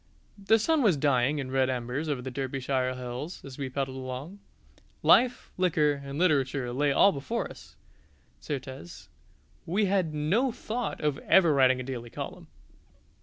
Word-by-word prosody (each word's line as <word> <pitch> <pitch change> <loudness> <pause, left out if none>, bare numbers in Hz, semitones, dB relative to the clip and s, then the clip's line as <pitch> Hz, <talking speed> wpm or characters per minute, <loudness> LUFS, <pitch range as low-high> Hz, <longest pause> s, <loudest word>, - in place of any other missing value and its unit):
The 220 +3 +5
sun 310 +8 +2
was 200 - +3
dying 140 0 +2
in 135 -2 -4
red 130 -1 +2
embers 130 +5 -3
over 135 -4 -2
the 130 - -5
Derbyshire 130 -1 -2
hills 125 +7 -6
as 135 0 -10
we 135 -2 -3
pedalled 135 0 -3
along. 130 +9 -6 0.6
Life, 250 -1 +4
liquor, 150 -6 +2
and 140 0 -6
literature 140 -7 +1
lay 145 +2 +1
all 200 - +5
before 195 +11 -3
us; - - -14 0.6
certes, 130 - -7 0.6
we 200 +6 +1
had 185 -4 +1
no 175 - +1
thought 230 0 -4
of 150 -2 0
ever 170 -5 +4
writing 130 -2 +4
a - - -4
daily 120 -2 -6
column! - - -7
140 Hz, 155 wpm, -28 LUFS, 130-175 Hz, 0.6 s, The